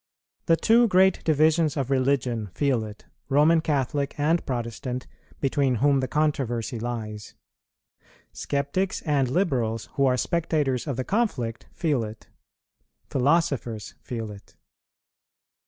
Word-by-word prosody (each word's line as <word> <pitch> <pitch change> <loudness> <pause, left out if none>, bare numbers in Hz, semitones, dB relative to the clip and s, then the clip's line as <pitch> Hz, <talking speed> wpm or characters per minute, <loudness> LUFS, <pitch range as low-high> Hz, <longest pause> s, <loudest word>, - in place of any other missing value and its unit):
The 165 - +6
two 230 +7 +4
great 190 -1 +4
divisions 155 0 +3
of 135 -1 -2
religion 130 -4 +1
feel 135 -6 +1
it, 105 -1 -10 0.2
Roman 150 +4 +4
Catholic 140 -2 -1
and 160 +4 +2
Protestant, 125 0 -4 0.3
between 135 -2 +1
whom 140 +3 +3
the 130 - -1
controversy 130 -5 -1
lies; 110 -3 -5 1.0
sceptics 145 +8 -2
and 140 -5 +1
liberals, 125 - 0
who 140 -2 +2
are 125 -1 +2
spectators 150 -5 0
of 135 -4 -2
the 130 - -1
conflict, 135 - -1
feel 150 -8 0
it; 110 0 -9 0.8
philosophers 135 -6 0
feel 115 -3 -5
it. 100 0 -14
135 Hz, 120 wpm, -25 LUFS, 120-155 Hz, 1.0 s, The